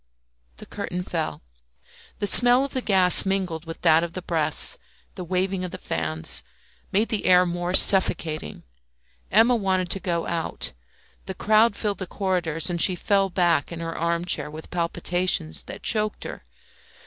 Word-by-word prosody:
The - - -11
curtain 180 -3 -5
fell. 165 - -4 0.7
The 205 - -2
smell 245 +5 +6
of 280 - -9
the 260 - -1
gas 190 -5 +4
mingled 185 -4 -2
with 165 0 -9
that 165 -1 +4
of 170 -1 -5
the 185 - -7
breaths, 160 - +1 0.3
the 185 - -7
waving 185 +1 -2
of 180 - -4
the - - -8
fans, 80 0 -3 0.5
made 210 +4 +1
the 215 - -2
air 180 0 +5
more 175 +1 -2
suffocating. 160 - +3 0.7
Emma 230 +4 +4
wanted 185 -4 -1
to 195 - +1
go 170 -3 -2
out; 165 -1 -4 0.5
the 190 - -5
crowd 215 +3 +3
filled 205 -3 -2
the 190 - -5
corridors, 175 -6 -2
and 175 -2 0
she 185 - +3
fell 195 +1 +1
back 175 -4 +1
in 170 - -7
her 165 0 -5
arm 170 +1 -2
chair 180 - -1
with 155 +1 -10
palpitations 175 - -1
that - - -10
choked 215 -1 0
her. - - -9
180 Hz, 165 wpm, -23 LUFS, 170-195 Hz, 0.7 s, smell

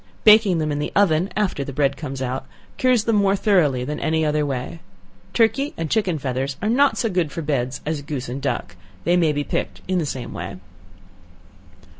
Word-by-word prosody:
Baking 210 -4 +6
them 155 -1 -1
in 145 - -2
the 150 - -2
oven 185 -2 +3
after 195 -9 0
the 140 - -6
bread 140 0 +1
comes 135 -3 -5
out, 130 +1 -3 0.3
cures 255 -4 +3
them 225 -1 +2
more 200 -1 +3
thoroughly 170 - +2
than 150 +3 -4
any 160 0 +1
other 150 -1 +1
way. 135 +4 -4 0.5
Turkey 240 +5 +1
and 165 -2 -3
chicken 195 -7 +1
feathers 135 0 -3
are 210 - -1
not 275 +4 +3
so 230 - +1
good 180 -7 0
for 165 - -5
beds 135 -3 -1
as 155 -1 -2
goose 145 -3 -5
and 130 +3 -5
duck; 90 -10 -3 0.3
they 175 - +3
may 165 -3 +3
be 145 0 -1
picked - - -3
in 185 -1 +1
the 160 - -1
same 130 -3 -5
way. 85 +3 -6
155 Hz, 200 wpm, -22 LUFS, 140-195 Hz, 0.5 s, Baking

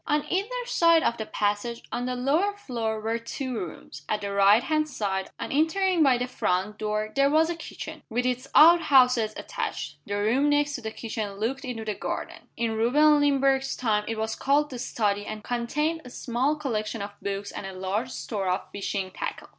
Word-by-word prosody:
On 295 0 +1
either 460 +7 -1
side 335 -9 +4
of 235 - +1
the 220 - -5
passage, 210 +3 -1
on 245 +1 -2
the 255 - -2
lower 315 +11 +1
floor, 230 - -3
were 225 +2 -2
two 255 +3 -5
rooms. 170 -6 -7
At 210 -1 0
the 200 0 -3
right 200 +3 +5
hand 310 -1 0
side, 195 -8 -2
on - - -4
entering 335 +4 +2
by 270 -4 +5
the 245 - -1
front 210 -4 -1
door, 215 0 -2
there 275 0 +4
was 320 +3 +3
a - - -3
kitchen, 315 -1 -8
with 245 +2 -1
its 250 0 -1
outhouses 255 -9 +6
attached. 150 -1 -4
The 205 - -2
room 235 +8 +2
next 290 0 +2
to 250 - -4
the 220 - -4
kitchen 220 -2 -5
looked 225 +7 -3
into 230 -3 -5
the 215 - -1
garden. - - -5
In 230 -1 0
Reuben 295 +7 +4
Limbrick's 275 -1 +2
time 215 -4 +1
it 225 - -3
was 220 0 -2
called 290 +2 +1
the 250 - -6
study 205 -4 -1
and 215 0 -7
contained 300 +7 -1
a 250 - -10
small 250 +5 -1
collection 225 -7 -3
of 200 - -6
books 200 0 -4
and 195 - -6
a 190 - -7
large 190 +6 -2
store 205 -6 -4
of 180 - -2
fishing 195 -1 -3
tackle. - - -5
240 Hz, 200 wpm, -26 LUFS, 210-290 Hz, -, outhouses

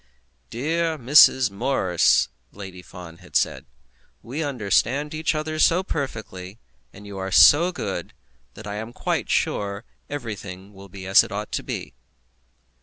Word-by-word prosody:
"Dear 160 - -1
Miss 130 -3 +6
Morris," 100 - +2 0.2
Lady 95 -2 -10
Fawn 90 -1 -12
had - - -17
said, - - 0 0.6
"we 135 +7 -5
understand 135 +3 0
each 155 0 -1
other 155 0 -3
so 175 +4 +4
perfectly, 110 - -6 0.3
and 100 +1 -14
you 100 -1 -8
are 95 0 -4
so 165 - +7
good, 100 - -5 0.4
that 110 - -11
I 105 0 -5
am 110 +2 -7
quite - - -2
sure 100 0 -1 0.2
everything 105 -8 -7
will 100 0 -13
be 95 0 -10
as 95 +1 +6
it - - -9
ought 105 +1 -5
to - - -2
be." - - -6
105 Hz, 145 wpm, -23 LUFS, 95-145 Hz, 0.6 s, so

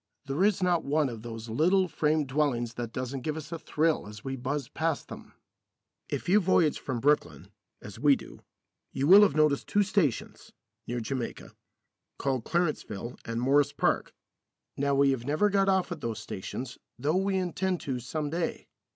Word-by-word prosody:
There 140 +6 0
is 200 -2 +2
not 175 -2 +2
one 145 0 +1
of 115 -3 -7
those 115 0 -7
little 180 - +3
frame 155 -2 +1
dwellings 130 -4 0
that 120 -1 -5
doesn't 130 +2 -4
give 155 +3 -3
us 155 +1 -8
a 165 - -4
thrill 155 -6 0
as 105 +1 -10
we 135 0 -3
buzz 135 +1 -3
past 160 +2 -2
them. - - -10 0.8
If - - -3
you 195 +4 +5
voyage 175 -5 +2
from 130 -3 -3
Brooklyn, 145 +4 +1 0.3
as - - -9
we - - +5
do, - - -11 0.5
you 135 - -1
will 195 +6 +9
have 195 -9 +4
noticed 150 -2 +2
two 205 - +3
stations 185 - -1 0.3
(near 120 0 -2
Jamaica) 125 +1 -4 0.7
called 130 -4 -1
Clarenceville 150 - -2
and 115 0 -3
Morris 140 +3 +3
Park. - - 0 0.6
Now 140 0 +1
we 140 0 +4
have 125 -3 -3
never 155 +9 +2
got 195 0 +3
off 190 -1 +1
at 170 - -5
those 115 -2 -3
stations, 120 +4 -6 0.2
though 150 +7 +1
we 195 0 +1
intend 185 0 -1
to 135 -6 -3
some 145 +4 -4
day. 170 +1 -3
145 Hz, 175 wpm, -28 LUFS, 125-170 Hz, 0.8 s, will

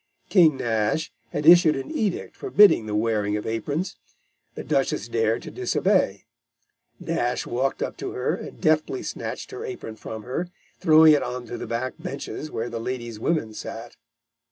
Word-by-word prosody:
King 165 -8 +5
Nash 115 +6 -1 0.2
had 150 +4 -3
issued 170 -1 +7
an 135 -1 -5
edict 205 -5 -2
forbidding 210 - +5
the 105 - -2
wearing 105 -1 0
of 105 - -6
aprons. 145 - -3 0.6
The - - -6
Duchess - - 0
dared 450 - 0
to - - -8
disobey. 190 - +1 0.7
Nash 120 +1 -1
walked 130 +3 -1
up - - -5
to - - -5
her - - -1
and - - -7
deftly 155 - +1
snatched - - -5
her 405 +2 -6
apron 375 - -6
from 110 -1 -7
her, 130 +9 -3 0.3
throwing 160 -2 +7
it 145 - +3
on 125 0 -4
to - - -6
the - - -5
back 120 +2 -2
benches 140 +2 -6
where 115 -3 -3
the 115 - -4
ladies' 120 -2 -5
women 115 -5 -1
sat. 115 +2 -8
130 Hz, 165 wpm, -24 LUFS, 115-170 Hz, 0.7 s, issued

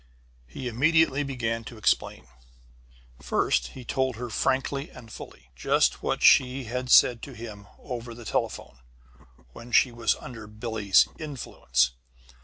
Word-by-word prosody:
He 125 - -7
immediately 145 +4 +3
began 115 -5 -3
to 115 - -10
explain. 110 - 0 1.0
First, 65 -1 +1
he 125 - -9
told 130 0 -1
her 120 +1 -6
frankly 135 +5 -1
and 115 -2 -13
fully, 65 - -12
just - - +1
what - - -2
she 130 +1 +5
had 125 +2 -4
said 120 -2 +6
to 140 - -9
him 110 -3 -9
over 120 -3 -7
the 120 -1 -11
telephone, 60 - -3 0.7
when 120 - -11
she 125 +2 +4
was 115 -1 0
under 115 -4 -10
Billie's 105 -2 +2
"influence." 65 - -1
120 Hz, 135 wpm, -26 LUFS, 110-130 Hz, 1.0 s, said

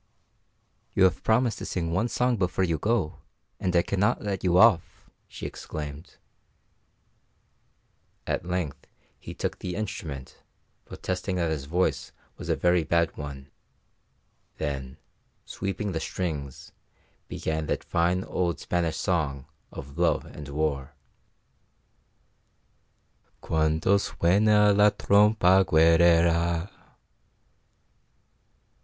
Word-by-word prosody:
"You - - +4
have 90 -4 +3
promised 115 0 +2
to - - -6
sing 85 -3 -2
one 95 +7 +1
song 125 +1 +1
before 95 -2 0
you 85 -4 0
go, 100 -5 -1 0.4
and 90 -1 -1
I 85 - +4
cannot 105 +5 0
let 100 -3 -3
you 90 -1 +3
off," 100 -5 +3 0.2
she - - -9
exclaimed. 75 0 -7 2.1
At - - -2
length 90 -5 -4 0.3
he - - -9
took - - -3
the 90 -1 -5
instrument, 75 -10 -6 0.4
protesting 95 +1 -4
that 85 -3 0
his 75 -3 -3
voice 90 +5 -1 0.2
was - - -8
a - - +2
very 90 -1 +2
bad 85 +2 +1
one; 70 -2 -8 1.1
then, 65 -1 -4 0.5
sweeping 100 +1 -4
the 80 - -2
strings, 75 -9 -5 0.6
began 80 -1 -3
that - - -2
fine 90 +2 0
old 85 -3 -2
Spanish 85 -2 -1
song 75 -8 -1 0.3
of 70 +1 -9
love - - +2
and 75 -2 -10
war: 70 -2 -2 2.4
"Cuando 80 +5 +1
suena 105 +3 +3
la 105 +1 +6
trompa 100 -2 +4
guerrera." 85 +1 +3
85 Hz, 110 wpm, -26 LUFS, 80-95 Hz, 2.4 s, la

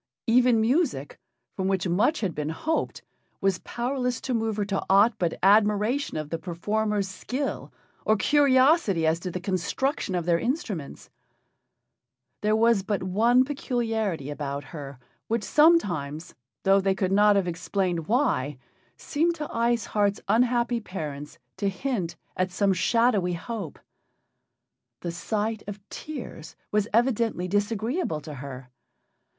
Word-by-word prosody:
Even 245 0 +4
music, 235 - 0 0.4
from 190 - -1
which 190 -1 0
much 205 - +2
had 190 -6 -1
been 150 0 -3
hoped, 315 - -2 0.4
was 195 -2 +1
powerless 250 0 -2
to 260 - -2
move 225 -2 -1
her 205 - 0
to 195 -1 -2
aught 200 +5 +6
but 170 -2 0
admiration 210 - +3
of 155 -1 -5
the 165 - -2
performers' 205 +4 -1
skill 255 +8 -4 0.3
or 215 - +3
curiosity 260 - +4
as 160 +1 +2
to 180 - -5
the 180 - -4
construction 190 - -1
of 175 -2 -1
their 170 -1 +2
instruments. 225 - -4 1.3
There 215 +1 +2
was 230 -2 +4
but 195 0 -2
one 230 +7 +3
peculiarity 225 - -2
about 145 -1 -4
her, 140 -1 -9 0.3
which 230 -1 -1
sometimes, 180 - +2 0.3
though 195 0 +4
they 190 0 +1
could 190 -1 -1
not 205 +1 +5
have 195 -2 +1
explained 175 -1 -2
why, 150 - +1 0.4
seemed 330 +3 0
to 300 -2 -5
Ice 235 -1 +1
Heart's 205 -1 +1
unhappy 240 0 +2
parents 150 -8 -7 0.2
to 200 - 0
hint 195 -3 -3 0.2
at 185 0 0
some 195 +2 +1
shadowy 210 -2 +2
hope. 180 -1 -5 1.2
The 170 - -3
sight 215 +5 -2
of 205 0 -6
tears 255 - -8 0.2
was 210 0 +1
evidently 230 -5 +1
disagreeable 205 - -1
to 150 0 -8
her. 130 -2 -9
205 Hz, 135 wpm, -26 LUFS, 175-235 Hz, 1.3 s, aught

